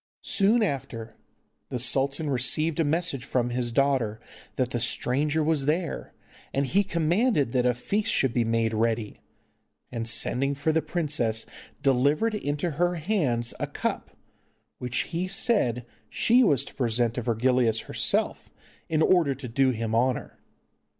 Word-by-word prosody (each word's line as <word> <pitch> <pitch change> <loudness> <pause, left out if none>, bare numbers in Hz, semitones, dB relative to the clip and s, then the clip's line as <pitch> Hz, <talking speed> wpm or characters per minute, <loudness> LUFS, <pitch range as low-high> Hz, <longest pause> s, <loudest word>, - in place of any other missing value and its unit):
Soon 215 +3 +3
after, 115 - -4 0.5
the - - -3
sultan 135 +5 +1
received 155 +5 0
a - - +4
message 155 -3 -1
from 125 -2 -1
his 120 -1 -2
daughter 125 -4 +1 0.4
that 130 -1 -1
the 120 - -1
stranger 145 +6 +1
was 150 -3 0
there, 165 +3 -2 0.4
and 140 +1 +1
he 195 +9 +2
commanded 170 - +1
that 125 -1 +2
a 125 - +2
feast 205 - -1
should 135 -3 +2
be 120 - +2
made 115 0 0
ready, 110 -1 -1 0.7
and, 115 -1 -3
sending 135 +4 0
for 145 +3 0
the 160 +1 +1
princess 145 -11 -1 0.4
delivered 140 - +2
into 150 -4 -2
her 175 +4 0
hands 150 - -1
a - - -2
cup, - - -3 0.7
which 125 +1 0
he 175 +3 -1
said 185 - +1 0.2
she 245 +3 +4
was 145 - +2
to - - -11
present 120 -2 0
to 125 - -3
Virgilius 120 0 +1
herself, - - -1 0.4
in 155 0 +2
order 165 -7 +3
to 130 0 -7
do 130 +3 +2
him 115 -2 -2
honour. 125 +2 0
135 Hz, 150 wpm, -26 LUFS, 120-160 Hz, 0.7 s, a